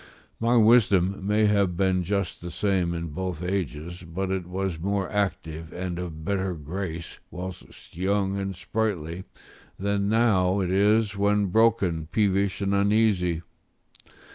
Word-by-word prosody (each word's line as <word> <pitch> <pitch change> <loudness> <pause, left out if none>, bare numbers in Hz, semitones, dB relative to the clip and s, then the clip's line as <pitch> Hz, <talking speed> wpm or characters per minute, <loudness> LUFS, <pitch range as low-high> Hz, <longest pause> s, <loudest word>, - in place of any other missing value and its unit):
My 120 +1 +3
wisdom 100 -4 +4
may 105 +1 +3
have 100 -4 +2
been 95 -1 +2
just 100 0 -2
the 85 - -6
same 90 -1 0
in 85 0 -4
both 90 +1 -4
ages, 90 -2 -3
but 90 +3 -4
it 95 -2 -2
was 95 -2 -3
more 100 +2 -1
active, 80 -6 -2
and 90 -1 -4
of 80 -3 -6
better 95 -2 -1
grace 85 +2 -6
whilst 90 -2 -9
young 95 +2 0
and 95 -1 -3
sprightly, 90 -3 -3 0.5
than 100 0 0
now 100 -4 +3
it 90 -2 -1
is 105 +2 +3
when 100 +1 +2
broken, 100 -8 +2
peevish, 100 -2 +1
and 100 0 0
uneasy. 100 -4 +2
95 Hz, 140 wpm, -26 LUFS, 90-100 Hz, 0.5 s, wisdom